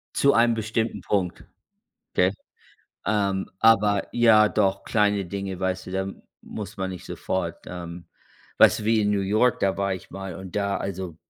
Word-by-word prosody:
Zu 140 0 +4
einem 115 0 +4
bestimmten 110 -1 -2
Punkt, 90 -2 -1 0.7
gell? 90 +1 +3 0.7
Ähm, 100 -2 0
aber 105 -3 +4
ja, 110 -3 +5
doch, 100 -2 +1
kleine 105 -2 +1
Dinge, 95 0 -5
weißt 95 -1 -2
du, - - -7
da 95 0 -1 0.3
muss - - -8
man 95 -1 -2
nicht 90 -2 -8
sofort, 90 -3 -4
ähm 85 -1 -7 0.6
weißt - - +7
du - - -6
wie 110 +1 +3
in 105 -1 +1
New 100 -1 +1
York, 110 +5 +2
da 95 -1 +1
war 100 -1 0
ich 95 - -9
mal 95 -2 -6
und 95 -1 -9
da 100 -1 0
also 95 -3 -5
100 Hz, 170 wpm, -25 LUFS, 95-105 Hz, 0.7 s, weißt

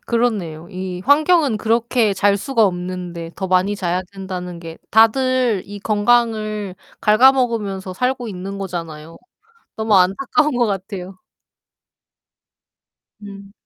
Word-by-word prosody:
그렇네요. 200 -9 -1
이 185 -1 -5
환경은 300 -3 +3
그렇게 225 0 +1
잘 200 +1 +2
수가 230 +2 +1
없는데 180 -2 -4
더 190 - -3
많이 185 +2 +1
자야 180 -1 -1
된다는 185 -3 -6
게 165 -1 -10
다들 235 -1 +3
이 205 +1 -8
건강을 215 -2 0 0.3
갉아먹으면서 215 -5 +2
살고 250 +4 -2
있는 195 0 -6
거잖아요. 165 -4 -6 0.6
너무 220 -1 +1
안타까운 250 +11 +2
것 240 -1 +2
같아요. 190 -2 -5 2.0
음. 200 -1 -11
200 Hz, 250 characters per minute, -19 LUFS, 185-230 Hz, 2.0 s, 환경은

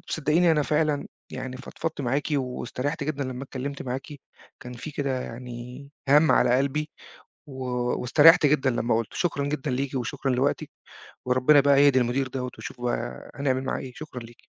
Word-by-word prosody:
صدِّقيني، 160 +3 +3
أنا 150 -2 +3
فعلًا 150 -1 0 0.3
يعني 130 -1 -5
فضفَضت 150 +4 -5
معاكِ 140 +2 0
واستريِّحت 135 +2 -2
جدًا 145 -2 -2
لمَّا 130 0 -5
اتكلَّمت 140 +2 -5
معاكِ. 130 +3 -5 0.5
كان 125 - -8
في 130 +6 -7
كده 135 -3 -2
يعني 125 +3 -8 0.2
هَمّ 150 +3 +6
على 125 0 +4
قلبي، 150 +3 -1 0.6
و 130 -2 -7 0.4
واستريِّحت 155 +6 +6
جدًا 140 -2 +3
لمَّا 120 -1 0
قُلِّته. 115 - -4
شكرًا 145 -5 0
جدًا 145 -2 -2
ليكِ 135 +1 -2
وشكرًا 130 +2 -2
لوقتِك، 130 +3 0 0.6
وربنا 130 +4 +5
بقى 140 0 +5
يهدي 135 -2 +5
المدير 130 +2 0
دوَّة، 125 -1 -4
واشوف 125 - -8
بقى 120 0 -3
هنعمل 135 -2 0
معاه - - -2
إيه. 130 -2 -8
شكرًا 150 -5 -8
ليكِ. 115 0 -14
135 Hz, 165 wpm, -26 LUFS, 125-145 Hz, 0.6 s, هَمّ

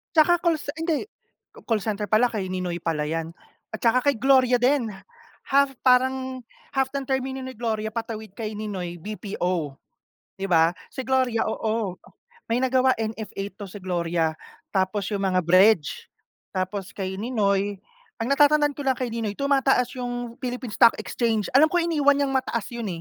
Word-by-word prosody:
Tsaka 345 +2 +5
call 340 -2 +2
ce 285 - -5
hindi, 325 +4 -1 0.4
ca - - -15
call 220 -3 +1
center 210 -1 -2
pala 220 +3 +4
kay 200 -4 -3
Ninoy 180 -2 -3
pala 160 -3 -1
'yan 165 +1 -3 0.4
at 220 - -4
tsaka 250 +4 +4
kay - - -5
Gloria 260 -1 +5
din, 255 -1 +3 0.6
half 275 0 +4
parang 260 0 +2 0.3
half 265 -1 +1
ng 275 - -1
termino 265 0 -2
ni 260 - -6
Gloria 220 -2 -2
patawid 220 -2 -5
kay 215 -2 -4
Ninoy 190 -5 -4
BPO. 180 -7 -3 0.6
Di 195 - -2
ba, 165 -3 +4 0.2
si 260 - -4
Gloria 255 -3 +1
oo, 220 -4 -2 0.5
may 235 +3 +1
nagawa 260 0 +3
NFA 220 -2 -4 0.2
'to 205 - -6
si 195 +2 -9
Gloria. 170 -3 0 0.4
Tapos 190 0 0
'yong 200 -1 -2
mga 185 -1 +2
bridge, 185 -1 +4 0.5
tapos 185 +1 -3
kay 190 -1 -4
Ninoy 205 -3 0 0.4
ang 225 - -1
natatandaan 290 +1 +4
ko 285 - -5
lang 265 -1 +3
kay 255 - -1
Ninoy 225 -2 -2
tumataas 270 -1 +2
'yong 245 -1 -4
Philippines 250 -3 -5
Stock 230 - +7
Exchange. 220 +1 -1
Alam 305 - +7
ko 350 - +3
iniwan 295 -4 +3
niyang 275 -1 0
mataas 235 -4 -1
'yon, 235 -2 -5
225 Hz, 165 wpm, -25 LUFS, 195-260 Hz, 0.6 s, Stock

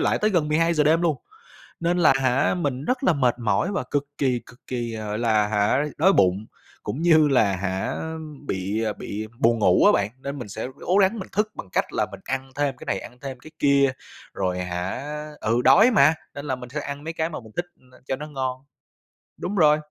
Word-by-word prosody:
lại - - +2
tới 215 +1 +2
gần 165 -5 +1
12:00 160 0 +2
đêm 165 +3 +3
luôn. 160 -5 +2 0.6
Nên 175 +1 +1
là 155 -5 +6
hả, 130 +2 +2
mình 145 -6 -2
rất 255 - -1
là 185 - +5
mệt 125 -4 +1
mỏi 120 - 0
và 180 - -2
cực 145 -1 0
kỳ, 125 -4 +1
cực 125 - -17
kỳ, 120 -2 -3
à, 110 -1 -5
gọi 105 +1 -3
là 110 -3 +2
hả 105 +7 +2
đói 190 +5 +5
bụng, 95 - +2 0.4
cũng 150 - -4
như 160 -3 +5
là 105 -8 +3
hả 95 0 -2
á, 160 0 -4 0.3
bị 100 +4 -1
bị 110 +2 -5
buồn 115 0 +3
ngủ 90 -4 +4
á - - +7
bạn, 100 +1 +1
nên 140 +1 -5
mình 120 -5 -7
sẽ 110 +5 -5
ố 185 - +1
gắng 200 +3 +3
mình 190 - -6
thức 210 +2 +1
bằng - - -8
cách - - 0
là - - 0
mình - - -9
ăn 135 0 -3
thêm 140 -2 0
cái - - -10
này 95 - -1
ăn 125 - -11
thêm 135 -2 -6
cái 155 - -13
kia. 140 -1 +4 0.4
Rồi 90 -2 -1
hả 90 +7 -3 0.4
ừ, 115 +3 +1
đói 205 - +7
mà, 155 - +5 0.2
nên 140 - -7
là 130 -3 -1
mình 125 -1 -9
sẽ 150 +1 -3
ăn 145 +1 -6
mấy 165 - -4
cái 160 0 -1
mà 155 - -6
mình 110 -1 -15
thích, 175 0 -1
ưm, 125 - -25 0.2
cho 130 - -1
nó 150 +2 -7
ngon. 130 -2 -4 0.7
Đúng 205 - -4
rồi. 150 -4 +5
135 Hz, 230 wpm, -24 LUFS, 110-160 Hz, 0.7 s, á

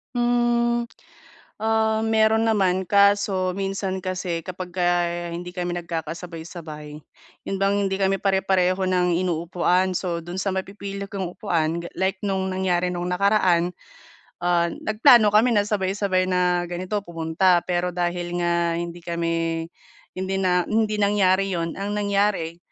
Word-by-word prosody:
Mm, 240 0 +1 0.7
ah, 220 0 +2
meron 220 0 +3
naman. 190 -4 +2
Kaso 200 -2 +3
minsan 195 -1 -2
kasi 185 -2 -2
kapagka 180 0 -4 0.5
hindi 175 +1 -6
kami 175 -1 -3
nagkakasabay-sabay, 165 -2 -7 0.5
yun 195 - -2
bang 195 0 +2
hindi 195 - -1
kami 195 0 +2
pare-pareho 190 -1 +2
ng 180 -1 +2
inuupuan. 180 +1 +1
So, 175 -2 -2
dun 175 +2 -5
sa 190 0 -1
mapipili 200 +1 -5
kong 190 -4 -5
upuan 170 -5 -1
ga - - -6
like 190 +2 +1
nung 190 -2 -1
nangyari 180 -1 0
nung 175 0 -3
nakaraan, 180 -2 +2 0.7
ah, 175 -1 +2
nagplano 220 - +5
kami 220 +4 +5
na 205 -1 +3
sabay-sabay 195 -2 0
na 180 -1 +1
ganito, 185 +4 -3
pumunta. 170 +2 +2
Pero 180 0 0
dahil 175 0 -2
nga 170 -1 +1
hindi 170 0 -5
kami 165 -1 -2 0.5
hindi 190 +1 -2
na 180 -1 +3
hindi 215 -1 +1
nangyari 195 -1 +2
'yun, 165 0 -2
ang 205 +1 -3
nangyari, 200 -5 0
185 Hz, 130 wpm, -23 LUFS, 175-200 Hz, 0.7 s, nagplano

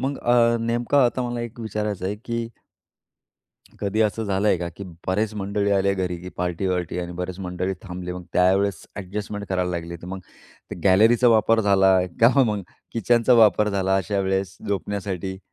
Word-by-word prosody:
मग 135 +2 -2
अ, 120 -1 +3
नेमकं 120 +4 0
आता 125 -1 +3
मला 120 0 -3
एक 120 0 -7
विचारायचं 105 -3 -3
आहे 100 +2 -3
की 115 -1 -3 1.3
कधी 100 +2 -1
असं 110 +1 +1
झालंय 100 0 +1
का, 85 0 -3
की 100 - -7 0.2
बरेच 105 +3 0
मंडळी 100 0 -1
आल्या 100 0 +2
घरी 90 -2 -2
की 90 - -8
पार्टी-वार्टी 90 0 -2
आणि 90 0 -4
बरेच 90 +1 -5
मंडळी 90 +1 -3
थांबले. 90 -1 -6
मग 90 -1 -8
त्यावेळेस 95 +1 +2
अ‍ॅडजस्टमेंट 105 +1 -5
करायला 90 -1 0
लागली. 85 -1 -5
तर 85 - -12
मग 95 +1 -6 0.6
गॅलरीचा 110 +6 +5
वापर 115 0 +4
झाला 95 -2 +4 0.2
का 130 +4 +6
मग 105 -5 0 0.3
किचनचा 120 +2 +2
वापर 105 -2 +5
झाला 95 -1 +1
अशा 95 +2 -1
वेळेस 95 0 -1
झोपण्यासाठी? 95 -1 -3
100 Hz, 160 wpm, -23 LUFS, 95-110 Hz, 1.3 s, का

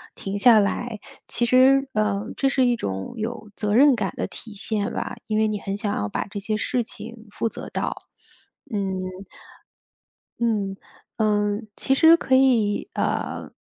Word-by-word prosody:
停 200 +1 -4
下 230 -1 +7
来， 220 +2 -2 0.3
其 240 - 0
实， 265 +2 +5
呃， 210 -1 0
这 275 - +2
是 260 -2 +2
一 245 -1 +3
种 95 - -4
有 220 -1 -5
责 210 -1 -1
任 280 +2 +7
感 195 -5 -2
的 - - -2
体 210 +4 -11
现 205 0 -2
吧， - - -4
因 215 -1 0
为 220 0 +3
你 210 -1 -2
很 195 0 -4
想 205 0 -2
要 105 - -1
把 - - -3
这 205 - -5
些 215 +1 -2
事 250 +3 0
情 225 0 -10
负 230 - -1
责 - - -8
到， - - -2 0.8
嗯。 205 - 0 1.6
嗯， 210 -4 0 0.4
呃， 210 -1 +1 0.2
其 270 - +1
实 325 +4 +7
可 260 - +2
以， 235 -6 +3
呃， - - -2
215 Hz, 175 characters per minute, -24 LUFS, 205-245 Hz, 1.6 s, 下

